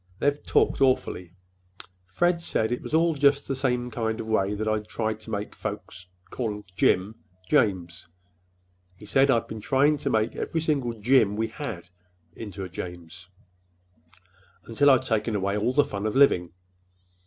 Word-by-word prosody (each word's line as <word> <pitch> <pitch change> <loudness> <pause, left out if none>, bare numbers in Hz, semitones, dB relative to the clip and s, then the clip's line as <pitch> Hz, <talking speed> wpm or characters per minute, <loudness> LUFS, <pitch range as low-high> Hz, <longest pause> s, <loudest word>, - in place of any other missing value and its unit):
They 145 - +3
talked 145 -1 0
awfully. 90 -9 0 0.7
Fred 175 - +1
said 110 -8 -1
it 125 - -2
was - - -3
all 165 +1 +3
just 140 -1 +2
the 135 - -1
same 125 -2 -1
kind 110 -1 -2
of 110 - -5
a - - -4
way 100 -1 +1
that 110 +1 -3
I'd 105 -1 -1
tried 110 -1 -3
to 110 - -12
make 105 -1 -4
folks 90 0 -7 0.2
call 105 -4 -4
Jim 95 +4 +2 0.3
'James.' 90 -4 0 0.9
He 105 - -14
said 135 +6 +3
I'd 115 -4 +3
been 110 -1 -8
trying 140 +6 +2
to - - -2
make 110 +1 0
every 165 - -2
single 140 -7 0
'Jim' 110 -1 +3
we 110 +1 -1
had 110 - -7 0.5
into 100 -3 -7
a - - -5
'James,' 90 0 -9 1.4
until 140 +5 +3
I'd 130 -2 +5
taken 115 -3 -1
away 100 0 -1
all 105 +4 +1
the 145 +2 +3
fun 100 -2 -4
of 105 - -3
living. 90 -11 +4
110 Hz, 165 wpm, -26 LUFS, 100-135 Hz, 1.4 s, I'd